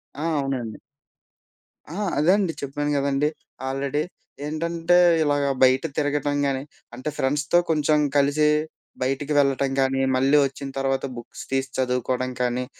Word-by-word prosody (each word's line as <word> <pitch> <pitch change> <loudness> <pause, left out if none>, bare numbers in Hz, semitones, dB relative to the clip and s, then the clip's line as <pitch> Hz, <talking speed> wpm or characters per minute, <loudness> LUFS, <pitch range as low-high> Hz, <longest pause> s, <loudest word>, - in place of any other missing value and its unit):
ఆ! 145 - -7 0.2
అవునండి. 130 -6 -3 1.1
ఆ! 165 - -7 0.2
అదే 155 +5 +4
అండి 185 -5 0
చెప్పాను 145 +1 -2
గదండీ! 140 +1 +1 0.4
ఆల్రెడీ 135 +2 -1 0.4
ఏంటంటే 170 +3 +1 0.3
ఇలాగ 145 -1 +1 0.2
బయట 130 +2 +5
తిరగటం 145 -1 0
గాని, 135 -1 -1 0.3
అంటే 130 +5 -4
ఫ్రెండ్స్‌తో 145 +4 +1
కొంచెం 150 -1 +2 0.2
కలిసి 145 +2 +3 0.5
బయటికి 135 +3 -1
వెళ్ళటం 140 -1 +2
గానీ, 135 0 +1
మళ్ళీ 135 +3 +4
ఒచ్చిన 135 +1 -5
తర్వాత 135 0 0
బుక్స్ 120 +1 -9
తీసి 135 0 0
చదువుకోవడం 130 0 -1
కానీ 125 0 0
140 Hz, 125 wpm, -24 LUFS, 130-150 Hz, 1.1 s, బయట